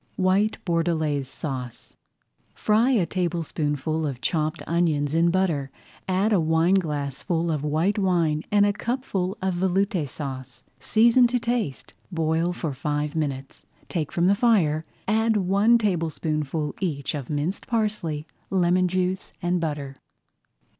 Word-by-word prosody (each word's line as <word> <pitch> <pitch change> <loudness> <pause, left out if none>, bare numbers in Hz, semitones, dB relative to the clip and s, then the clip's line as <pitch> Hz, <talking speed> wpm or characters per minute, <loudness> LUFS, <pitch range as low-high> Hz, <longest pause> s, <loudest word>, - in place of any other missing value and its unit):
WHITE 195 +3 +2
BORDELAISE 160 -5 0
SAUCE 130 -4 -6 0.6
Fry 220 +4 +3
a 225 -10 +3
tablespoonful 160 -3 -1
of 135 -4 -4
chopped 155 +2 -1
onions 155 -4 +1
in 165 +1 +4
butter, 170 -7 0 0.4
add 195 +4 +2
a 195 - +4
wineglassful 160 -1 +1
of 150 -2 -2
white 160 +8 +1
wine 170 -5 +2
and 205 0 +4
a 205 - +2
cupful 205 -5 -2
of 190 -1 +1
Veloute 185 - 0
Sauce. 130 -5 -7 0.2
Season 235 - +5
to 245 +1 0
taste, 235 - -2 0.2
boil 165 0 +1
for 165 -4 -3
five 150 +2 -2
minutes, 140 -3 -4 0.2
take 160 -5 -2
from 170 - +1
the 195 - +5
fire, 200 -9 +3 0.2
add 220 +1 +2
one 200 +5 +4
tablespoonful 160 -6 -1
each 150 -8 -2
of 140 -5 -5
minced 150 +6 -2
parsley, 210 -10 -1 0.2
lemon 180 -1 +3
juice, 185 +1 -2
and 175 0 0
butter. 145 -4 -4
170 Hz, 130 wpm, -25 LUFS, 150-195 Hz, 0.6 s, Season